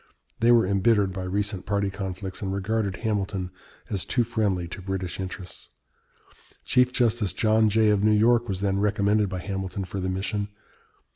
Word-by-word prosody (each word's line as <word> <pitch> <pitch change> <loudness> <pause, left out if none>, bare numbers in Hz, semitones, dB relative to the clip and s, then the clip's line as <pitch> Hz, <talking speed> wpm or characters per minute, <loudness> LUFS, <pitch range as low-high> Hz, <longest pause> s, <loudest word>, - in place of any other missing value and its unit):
They 115 +1 +4
were 115 -3 +5
embittered 100 0 +2
by 95 -1 -4
recent 100 0 -2
party 100 -1 0
conflicts, 95 -1 -5
and 95 -2 -2
regarded 100 0 -1
Hamilton 100 -4 -2 0.4
as 100 -4 -2
too 120 - +1
friendly 105 -6 -1
to 95 - -7
British 95 -1 -4
interests. 95 -1 -7 1.0
Chief 125 0 +3
Justice 115 -7 +1
John 110 +1 +3
Jay 110 0 +4
of 105 -1 +1
New 110 - +5
York 120 +2 +4
was 95 -1 -3
then 100 -1 +1
recommended 105 0 +2
by 95 - -4
Hamilton 95 0 -4
for 95 +2 -5
the 95 0 -2
mission. 100 +2 -2
100 Hz, 165 wpm, -26 LUFS, 95-110 Hz, 1.0 s, were